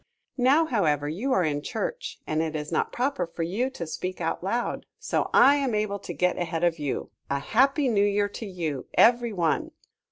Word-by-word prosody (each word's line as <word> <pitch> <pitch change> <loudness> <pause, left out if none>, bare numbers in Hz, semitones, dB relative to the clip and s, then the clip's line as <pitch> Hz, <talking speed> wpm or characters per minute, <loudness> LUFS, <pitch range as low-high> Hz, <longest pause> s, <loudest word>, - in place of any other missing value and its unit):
Now, 275 +6 +5
however, 155 - +1
you 200 - -2
are 190 - +3
in 145 -2 -1
Church 340 - -4
and 155 +1 0
it 160 -1 -2
is 150 -1 -4
not - - 0
proper 245 -8 -1
for 165 0 -4
you 210 +10 -1
to 220 -10 -6
speak 185 +3 -5
out 165 0 -2
loud, 235 +6 -2
so - - -1
I 285 +1 +6
am 270 -6 0
able 210 -1 -1
to - - -7
get 180 0 0
ahead 165 -1 -2
of 170 -2 +2
you. 145 -2 -3 0.2
A 140 - +1
Happy 270 - +2
New 210 -4 +3
Year 205 0 +2
to 220 +2 -7
you, 160 -8 -4
every 240 0 +5
one. 185 - 0
195 Hz, 200 wpm, -26 LUFS, 165-245 Hz, 0.2 s, I